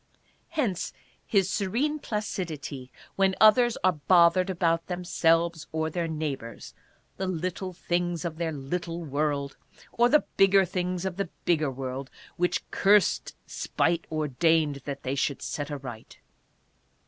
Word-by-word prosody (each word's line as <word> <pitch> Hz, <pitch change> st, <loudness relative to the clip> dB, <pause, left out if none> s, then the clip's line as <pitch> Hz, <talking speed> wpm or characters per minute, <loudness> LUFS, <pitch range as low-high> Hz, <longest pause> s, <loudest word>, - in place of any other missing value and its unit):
Hence 255 Hz, -, -1 dB, 0.3 s
his 195 Hz, -4 st, +3 dB
serene 240 Hz, +11 st, 0 dB
placidity 160 Hz, -, -4 dB, 0.3 s
when 190 Hz, -1 st, +3 dB
others 230 Hz, +2 st, +6 dB
are 185 Hz, -, +5 dB
bothered 175 Hz, +3 st, +4 dB
about 165 Hz, -2 st, +1 dB
themselves 170 Hz, -2 st, +1 dB
or 160 Hz, 0 st, -1 dB
their 170 Hz, 0 st, -1 dB
neighbors, 150 Hz, -7 st, -5 dB, 0.4 s
the 190 Hz, -, -2 dB
little 185 Hz, +1 st, -3 dB
things 175 Hz, -1 st, -2 dB
of 160 Hz, -2 st, -4 dB
their 165 Hz, -1 st, -1 dB
little 165 Hz, +4 st, -4 dB
world, 145 Hz, -1 st, -1 dB, 0.3 s
or 240 Hz, +1 st, +3 dB
the 300 Hz, +3 st, +4 dB
bigger 195 Hz, 0 st, +6 dB
things 180 Hz, 0 st, -2 dB
of 190 Hz, -1 st, -3 dB
the 200 Hz, -3 st, -2 dB, 0.2 s
bigger 155 Hz, -4 st, +2 dB
world, 130 Hz, +1 st, -5 dB, 0.3 s
which 180 Hz, 0 st, 0 dB
cursed 200 Hz, -1 st, +3 dB
spite 170 Hz, 0 st, -1 dB
ordained 155 Hz, 0 st, +2 dB
that 140 Hz, -1 st, -5 dB
they 130 Hz, -, -2 dB
should 140 Hz, 0 st, -1 dB
set 145 Hz, 0 st, -4 dB
aright. 130 Hz, -6 st, -8 dB
170 Hz, 130 wpm, -27 LUFS, 150-190 Hz, 0.4 s, others